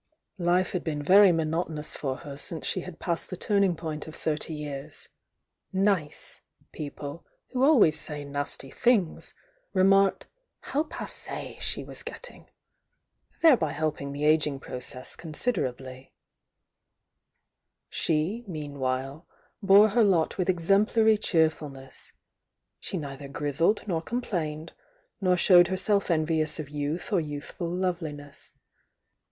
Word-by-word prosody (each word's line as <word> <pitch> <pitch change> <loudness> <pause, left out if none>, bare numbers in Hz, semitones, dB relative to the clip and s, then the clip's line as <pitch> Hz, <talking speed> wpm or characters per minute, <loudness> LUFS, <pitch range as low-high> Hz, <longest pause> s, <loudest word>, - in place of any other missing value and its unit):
Life 180 +1 +2
had 180 - -2
been 150 -3 -3
yeiy 195 +4 +7
monotonous 160 -1 -2
for 135 -3 -2
net 140 -1 -7
Jnoe 160 +2 -3
she 185 - 0
had 175 -2 -9
passed 170 -2 -2
the 185 - -5
tuming 200 -2 +2
pomt 160 -2 -5
of 155 - -9
thirty 155 0 0
year8, 145 0 -6 0.6
"nice" 190 -6 -1 0.3
p^ple, 145 +1 -6 0.3
who 265 -1 +5
S« 155 0 +1
^f«; 145 -1 -6
nf»ty 140 -1 -3
things, 220 -9 +1 0.4
remarked 195 +1 +4 0.4
"ho47«.^e 305 +3 -3
she - - -2
was - - -3
gett^g, - - -9 1.0
—thereby 240 - +5
helpmg 150 -2 -2
the 145 +1 -2
ageing 150 -2 +3
process 125 -1 -5
oonsiaerably 135 - -3 1.8
She, 165 +9 -1
meanwhile, 140 -2 -4 0.3
bore 200 +2 +7
he? 215 - -3
lotwlthex 185 -2 +2
smplanr 215 +4 +4
cheerfuhiess,— 150 -6 -1 0.7
she 190 - -3
neither 140 -2 -6
grizzled 145 +9 0
nor 165 -4 0
com 240 +8 -3
plamed, 155 -6 -4 0.5
nor 180 -2 +3
showed 175 -1 +7
herself 195 +2 0
envious 155 -1 +1
of 150 -2 -5
youth 150 +7 -3
or 185 - +3
youthful 150 +3 -5
lovelmess. 170 -6 -4
160 Hz, 115 wpm, -27 LUFS, 145-190 Hz, 1.8 s, yeiy